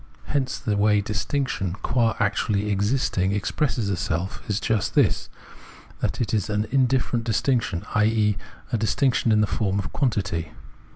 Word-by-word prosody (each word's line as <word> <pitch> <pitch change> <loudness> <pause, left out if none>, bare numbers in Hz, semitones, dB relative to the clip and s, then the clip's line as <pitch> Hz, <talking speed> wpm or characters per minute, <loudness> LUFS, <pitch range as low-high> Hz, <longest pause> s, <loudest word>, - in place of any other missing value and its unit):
Hence, 135 -3 -1
the 105 - -1
way 105 0 +3
distinction 105 -2 -2
qua 115 -2 +2
actually 105 -1 +1
existing 100 -2 +1
expresses 105 +1 -1
itseK 90 0 -2
is 105 0 +1
just 110 -2 0
this, - - +2 0.7
that - - -2
it 115 -3 -1
is 105 -1 0
an 105 0 0
indifferent 130 -3 +2
distinction, 115 -5 0
i.e. 105 -1 +3 0.4
a 115 - +1
distinction 120 +2 +2
in 105 0 +4
the - - +4
form 100 -2 -1
of 100 - -3
quantity. 100 - -1
105 Hz, 140 wpm, -24 LUFS, 100-120 Hz, 0.7 s, in